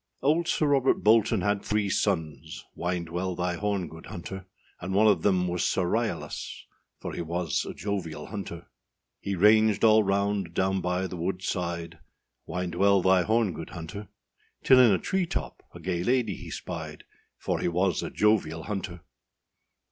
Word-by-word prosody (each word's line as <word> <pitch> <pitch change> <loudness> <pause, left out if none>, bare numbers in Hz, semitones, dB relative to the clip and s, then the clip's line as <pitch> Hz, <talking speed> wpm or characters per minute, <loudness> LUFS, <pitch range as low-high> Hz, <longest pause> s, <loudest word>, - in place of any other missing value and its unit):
] - - -45
OLD 160 +4 +2
Sir 155 - +1
Robert 140 -2 +2
Bolton 110 -1 +4
had 100 +1 0
three 105 -1 0
sons, 80 -5 -2
Wind 85 -1 -3
well 90 +2 -2
thy 90 0 -1
horn, 100 0 -1
good 80 +1 -12
hunter; 95 +2 -7 0.3
And 95 +2 -4
one 105 +2 +5
of 100 -6 +4
them 90 -2 +2
was 90 -2 -1
Sir 95 - +1
Ryalas, 115 +4 -3 0.3
For - - -6
he - - -4
was 85 -1 -2
a - - -7
jovial 95 -6 -4
hunter. 95 -5 -7 0.5
He 100 - -3
ranged 105 +2 +4
all 110 -1 +7
round 100 -3 0
down 95 0 +1
by 90 +1 -1
the 90 -1 -6
wood 90 +2 -3
side, 85 -3 -3 0.5
Wind 90 -1 -3
well 100 +1 +3
thy 95 -1 +5
horn, 110 0 +1
good 80 - -7
hunter, 90 +5 -8 0.6
Till 130 - +7
in 125 -4 +7
a 95 - +4
tree 190 - -1
top - - -4
a 85 - -11
gay 85 0 -2
lady 125 0 +1
he - - -9
spied, - - -6 0.3
For - - -2
he - - -1
was 90 0 +1
a - - -4
jovial 95 -7 +1
hunter. 95 -5 -5
95 Hz, 175 wpm, -27 LUFS, 85-105 Hz, 0.6 s, all